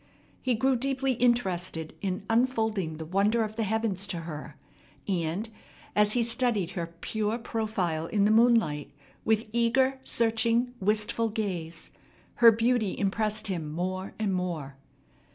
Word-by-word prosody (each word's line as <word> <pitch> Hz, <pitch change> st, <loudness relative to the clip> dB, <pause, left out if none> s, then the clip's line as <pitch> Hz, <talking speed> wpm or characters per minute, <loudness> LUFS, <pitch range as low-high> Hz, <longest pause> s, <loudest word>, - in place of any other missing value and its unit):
He 255 Hz, -2 st, +1 dB
grew 265 Hz, +4 st, +2 dB
deeply 270 Hz, +1 st, 0 dB
interested 185 Hz, -10 st, 0 dB
in 190 Hz, -1 st, -2 dB
unfolding 220 Hz, -8 st, +1 dB
the 160 Hz, -, -6 dB
wonders 205 Hz, +6 st, +2 dB
of -, -, -18 dB
the 230 Hz, -, -2 dB
heavens 210 Hz, -2 st, -1 dB
to 170 Hz, -3 st, -3 dB
her; 155 Hz, -2 st, -8 dB, 0.5 s
and, 180 Hz, +2 st, -1 dB, 0.5 s
as 210 Hz, 0 st, +4 dB
he 245 Hz, -, +2 dB
studied 230 Hz, -6 st, +1 dB
her 170 Hz, -2 st, -5 dB
pure 220 Hz, +1 st, -1 dB
profile 205 Hz, -9 st, -2 dB
in 205 Hz, +1 st, +2 dB
the 210 Hz, -, +4 dB
moonlight 225 Hz, -10 st, +3 dB, 0.4 s
with 220 Hz, 0 st, +2 dB
eager, 260 Hz, +3 st, +2 dB
searching, 230 Hz, +1 st, +2 dB
wistful 210 Hz, +3 st, +1 dB
gaze, 180 Hz, -7 st, -4 dB, 0.5 s
her 235 Hz, -1 st, +9 dB
beauty 225 Hz, -2 st, +1 dB
impressed 210 Hz, +1 st, 0 dB
him 170 Hz, -6 st, -3 dB
more 185 Hz, +4 st, -3 dB
and 210 Hz, -3 st, 0 dB
more. 170 Hz, -7 st, -3 dB
215 Hz, 135 wpm, -28 LUFS, 180-230 Hz, 0.5 s, her